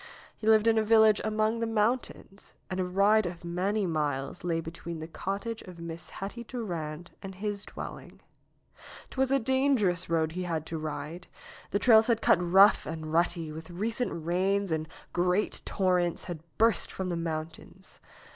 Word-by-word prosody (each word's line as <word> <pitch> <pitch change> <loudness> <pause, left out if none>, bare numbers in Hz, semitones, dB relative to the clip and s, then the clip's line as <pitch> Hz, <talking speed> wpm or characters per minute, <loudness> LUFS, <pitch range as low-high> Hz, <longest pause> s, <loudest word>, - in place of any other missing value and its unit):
He 215 - -6
lived 220 -1 +6
in 225 -1 +4
a - - +2
village 220 -1 +5
among 215 +1 0
the 230 - -1
mountains, 220 -2 -2 0.2
and 185 - -2
a - - +2
ride 200 +3 +3
of 175 0 -8
many 190 +4 0
miles 150 -2 -2
lay 170 -2 0
between 165 +1 -6
the 160 0 -6
cottage 200 +6 -4
of 180 -2 -11
Miss 170 0 -7
Hetty 205 +5 -6
Durand 175 -9 -5
and 195 -1 -8
his 205 +1 -4
dwelling. - - -9 0.9
'Twas 265 -1 +1
a 275 - +4
dangerous 255 -9 +1
road 160 -1 +1
he 180 +3 -4
had 165 -3 -2
to 160 0 -4
ride. 155 +3 -5 0.4
The - - +1
trails 220 +1 +6
had 230 -2 +2
cut 180 - +4
rough 190 +4 +5
and 155 -1 -5
rutty 170 -1 +1
with 160 +2 -9
recent 210 -1 -2
rains 190 +2 +1
and 160 0 -1 0.3
great 180 +3 +1
torrents 180 -3 +1
had 175 -3 -6 0.2
burst 225 -1 +2
from 190 -1 -4
the 175 - -1
mountains. 165 +3 -6
185 Hz, 165 wpm, -29 LUFS, 165-215 Hz, 0.9 s, lived